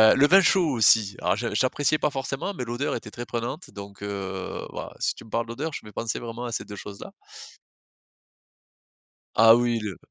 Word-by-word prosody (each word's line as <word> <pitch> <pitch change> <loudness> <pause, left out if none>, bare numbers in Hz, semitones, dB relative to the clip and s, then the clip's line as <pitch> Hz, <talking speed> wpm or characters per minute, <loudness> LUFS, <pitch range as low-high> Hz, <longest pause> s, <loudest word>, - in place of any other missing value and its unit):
le 145 +2 +5
vin 195 +3 +7
chaud 180 -2 +4
aussi, 110 -5 +4
alors 90 +2 +2
j'appréciais 130 +6 +1
pas 150 - +2
forcément, 135 +7 -3
mais 125 - -4
l'odeur 120 +4 -2
était 105 - -7
très 120 0 -6
prenante, 120 - -4
donc 100 0 -10
heu, 95 -2 -4
bah, - - -6
si - - +1
tu - - -12
me - - -15
parles 115 +1 -1
d'odeur, 145 +7 -4
je - - -7
vais 105 - -10
penser 115 +1 -3
vraiment 120 +1 -6
à 120 - -4
ces - - -2
2 105 - -8
choses-là. 100 0 -9 2.2
Ah 115 0 +8
oui 120 -1 +1
le 105 -6 -5
115 Hz, 190 wpm, -25 LUFS, 105-135 Hz, 2.2 s, Ah